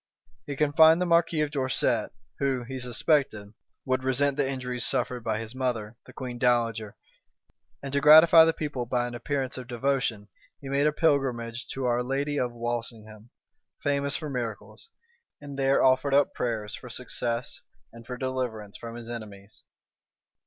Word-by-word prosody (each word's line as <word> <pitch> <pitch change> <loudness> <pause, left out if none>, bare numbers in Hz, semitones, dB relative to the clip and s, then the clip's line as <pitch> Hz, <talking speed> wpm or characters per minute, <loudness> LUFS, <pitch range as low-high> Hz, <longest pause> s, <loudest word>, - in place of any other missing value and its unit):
He 145 - -4
confined 160 +3 +5
the 180 - +1
marquis 170 -2 +2
of 150 -1 -1
Dorset, 130 -5 0 0.3
who, 135 -3 0
he 130 +2 -6
suspected, 125 -4 0 0.3
would 130 0 0
resent 135 +2 +1
the 140 -2 0
injuries 125 -2 -3
suffered 125 -2 -1
by 110 -1 -1
his 115 +1 -6
mother, 120 -4 -3
the - - -12
queen 125 -1 -7
dowager; 115 -4 +1 0.9
and, 135 0 -6
to 140 - +1
gratify 160 +2 +9
the 165 - +3
people 140 -7 -4
by 120 0 0
an 120 - -7
appearance 130 +1 -3
of 125 - -9
devotion, 120 -4 -1 0.3
he 135 - -8
made 140 +2 +2
a - - +3
pilgrimage 130 -7 0
to 135 -1 -3
our 120 0 +1
lady 140 +3 -1
of 125 -1 -1
Walsingham, 115 -2 -6 0.5
famous 140 0 0
for 155 - -6
miracles; 125 - -6 0.5
and 145 -1 -9
there 135 0 +3
offered 130 +1 +3
up 145 - +3
prayers 110 -3 -3
for 125 - -8
success, 120 -1 -4 0.3
and 115 0 -13
for 125 - -5
deliverance 125 -6 -4
from 115 0 -8
his 120 -1 -9
enemies. 110 -3 -9
125 Hz, 160 wpm, -27 LUFS, 115-140 Hz, 0.9 s, gratify